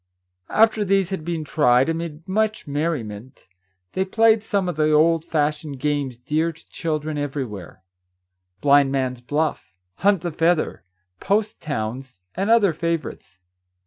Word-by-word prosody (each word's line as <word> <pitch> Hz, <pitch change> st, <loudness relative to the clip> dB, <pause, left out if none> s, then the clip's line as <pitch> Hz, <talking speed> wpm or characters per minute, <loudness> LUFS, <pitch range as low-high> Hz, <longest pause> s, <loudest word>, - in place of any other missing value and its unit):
After 220 Hz, -1 st, +3 dB
these 195 Hz, -1 st, +1 dB
had 190 Hz, -5 st, -3 dB
been 165 Hz, -1 st, -3 dB
tried, 130 Hz, -4 st, +3 dB
amid 165 Hz, -1 st, -4 dB
much 215 Hz, +2 st, 0 dB
merriment, 130 Hz, -6 st, -4 dB, 0.5 s
they 190 Hz, -, +1 dB
played 220 Hz, +3 st, +3 dB
some 200 Hz, -3 st, -1 dB
of 175 Hz, -, -2 dB
the 155 Hz, 0 st, +2 dB
old 160 Hz, +1 st, +4 dB
fashioned 150 Hz, -3 st, -2 dB
games 145 Hz, -3 st, -1 dB
dear 155 Hz, +6 st, -1 dB
to 160 Hz, 0 st, -21 dB
children 155 Hz, -2 st, -3 dB
every 145 Hz, -1 st, -2 dB
where, 100 Hz, -4 st, -10 dB, 0.4 s
— 90 Hz, +1 st, -50 dB
blind 140 Hz, -1 st, +5 dB
man's 130 Hz, -2 st, -1 dB
buff, 145 Hz, -8 st, -2 dB, 0.2 s
hunt 195 Hz, -1 st, +3 dB
the 175 Hz, -, -3 dB
feather, 165 Hz, +1 st, +1 dB, 0.4 s
post 210 Hz, +1 st, 0 dB
towns, 130 Hz, -4 st, -4 dB
and 195 Hz, +3 st, -2 dB
other 215 Hz, -6 st, +5 dB
favourites. 165 Hz, -, -4 dB
155 Hz, 145 wpm, -22 LUFS, 135-175 Hz, 0.5 s, blind